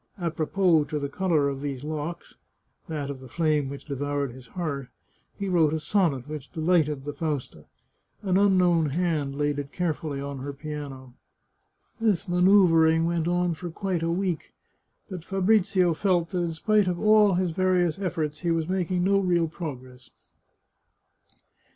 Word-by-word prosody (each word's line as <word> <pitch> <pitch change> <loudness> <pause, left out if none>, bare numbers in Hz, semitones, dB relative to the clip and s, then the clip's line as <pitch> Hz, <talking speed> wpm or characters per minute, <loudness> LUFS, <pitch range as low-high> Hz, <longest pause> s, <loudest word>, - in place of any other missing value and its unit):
A 170 -3 -2
propos 160 -1 +2
to 150 +1 -3
the 140 -1 -3
colour 160 -3 +1
of 140 -1 -3
these 140 -2 -4
locks 155 +2 -5 0.3
— - - -44
that 145 -3 -3
of 135 - -8
the 130 - -11
flame 150 0 0
which 140 0 -8
devoured 145 -1 -2
his 125 0 -13
heart 140 -3 -4 0.2
— - - -41
he 200 - -2
wrote 165 -5 +3
a 160 - 0
sonnet 150 - 0
which 150 -3 -7
delighted 155 -4 +1
the 145 - -4
Fausta. 150 -3 -4 0.6
An 185 -2 +1
unknown 180 -5 +4
hand 155 -3 -1
had - - -8
laid 145 -1 0
it 140 0 -6
carefully 155 -5 -2
on 140 -1 -5
her 140 +2 -5
piano. 140 -3 -7 0.9
This 215 -6 +1
manoeuvring 175 -3 +5
went 170 -1 0
on 175 0 +1
for 170 +2 -6
quite 180 0 -2
a 165 - 0
week, 180 -1 -2 0.5
but 185 -5 -7
Fabrizio 190 -2 +2
felt 175 -1 +1
that 180 - -2
in 170 -1 -2
spite 210 +4 +2
of 175 -1 -1
all 215 -2 +5
his 180 -1 0
various 180 -1 +1
efforts, 155 -5 -2
he 175 - -2
was 165 -1 0
making 180 -1 0
no 195 +1 +3
real 175 -3 +2
prc^gress. 130 -6 -8
165 Hz, 170 wpm, -26 LUFS, 145-180 Hz, 0.9 s, manoeuvring